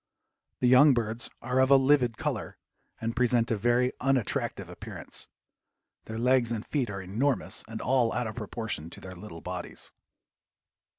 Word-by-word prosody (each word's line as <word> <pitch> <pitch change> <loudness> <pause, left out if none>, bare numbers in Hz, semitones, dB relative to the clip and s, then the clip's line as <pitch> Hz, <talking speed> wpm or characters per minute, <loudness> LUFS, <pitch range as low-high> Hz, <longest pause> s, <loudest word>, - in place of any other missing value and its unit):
The 125 - +4
young 130 +3 +7
birds 115 0 0
are 125 +2 0
of 130 0 +4
a 140 - +8
livid 130 -4 +3
color - - -3 0.4
and 115 0 -3
present 120 -2 +2
a - - +3
very 120 +4 +2
unattractive 130 -4 0
appearance. - - -7 0.8
Their 110 - -6
legs 125 0 +3
and 110 -1 -3
feet 135 -7 -1
are 95 -2 -5
enormous 105 0 0
and 110 0 -6
all 125 -2 +2
out 120 0 -1
of 110 - -4
proportion 110 -7 -4
to - - -11
their 95 0 -9
little 85 -2 -10
bodies. 90 0 -6
120 Hz, 160 wpm, -28 LUFS, 110-130 Hz, 0.8 s, a